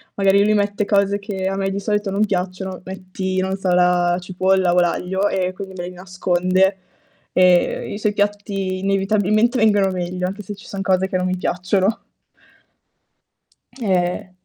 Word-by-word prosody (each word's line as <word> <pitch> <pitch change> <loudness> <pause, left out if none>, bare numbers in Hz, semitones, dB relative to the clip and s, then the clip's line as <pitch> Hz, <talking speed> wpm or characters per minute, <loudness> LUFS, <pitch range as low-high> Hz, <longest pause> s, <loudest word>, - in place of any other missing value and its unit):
magari 195 0 +4
lui 215 +1 +3
mette 205 0 0
cose 200 -1 +2
che 195 -2 -4
a 195 - -1
me 195 0 -1
di 195 +1 -3
solito 210 -1 -1
non 205 +2 +2
piacciono. 185 -1 -3
Metti, 185 0 -4
non 190 +1 -1
so, 190 -1 -2
la 180 0 +3
cipolla 185 0 +1
o 180 - +4
l'aglio 190 +3 0
e 185 -1 -1
quindi 190 0 -8
me 175 0 -4
li 180 - -8
nasconde 185 +1 0 0.6
e 180 +1 +3
i - - -4
suoi 210 0 0
piatti 200 -2 -2
inevitabilmente 205 +4 +1
vengono 205 -4 +3
meglio 180 0 -3
anche 200 +2 -6
se 205 - -6
ci 200 - -14
son 195 -1 -5
cose 190 -1 +1
che 185 - -5
non 180 0 -1
mi 185 0 -1
piacciono. 185 +4 0 1.8
Eh. 185 -3 -1
190 Hz, 165 wpm, -20 LUFS, 185-200 Hz, 1.8 s, magari